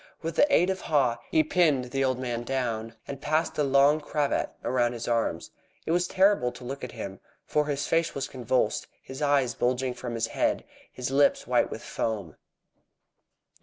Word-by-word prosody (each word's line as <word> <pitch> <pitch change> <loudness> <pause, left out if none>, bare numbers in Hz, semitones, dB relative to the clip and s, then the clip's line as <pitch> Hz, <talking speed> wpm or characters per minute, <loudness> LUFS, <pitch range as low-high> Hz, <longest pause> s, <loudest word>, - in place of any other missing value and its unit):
With 165 0 -3
the 290 - +4
aid 180 +3 +4
of 190 - -4
Haw, 130 -6 +1
he 155 - +4
pinned 150 -7 +2
the 135 +1 0
old 130 -1 +1
man 120 -2 -3
down, 115 -3 -2
and 140 -1 -6
passed 155 +2 0
a - - +4
long 140 +2 +4
cravat 145 -1 0
around 120 -1 +1
his 120 -1 -6
arms. 115 -8 -1 0.3
It - - -1
was 175 +1 +2
terrible 190 -10 +3
to 125 - -11
look 135 +3 -6
at 125 - -6
him, 100 -5 -6 0.3
for 150 -1 +1
his 145 -1 -1
face 165 0 +1
was 135 0 -2
convulsed, 125 0 0 0.2
his 130 +1 -8
eyes 140 -4 +2
bulging 125 +1 0
from 120 -1 -6
his 115 0 0
head, - - +1
and - - -25 0.3
his 125 +1 -4
lips 140 +1 +3
white - - +2
with - - -7
foam. 100 -8 -3
130 Hz, 190 wpm, -27 LUFS, 120-150 Hz, 0.3 s, the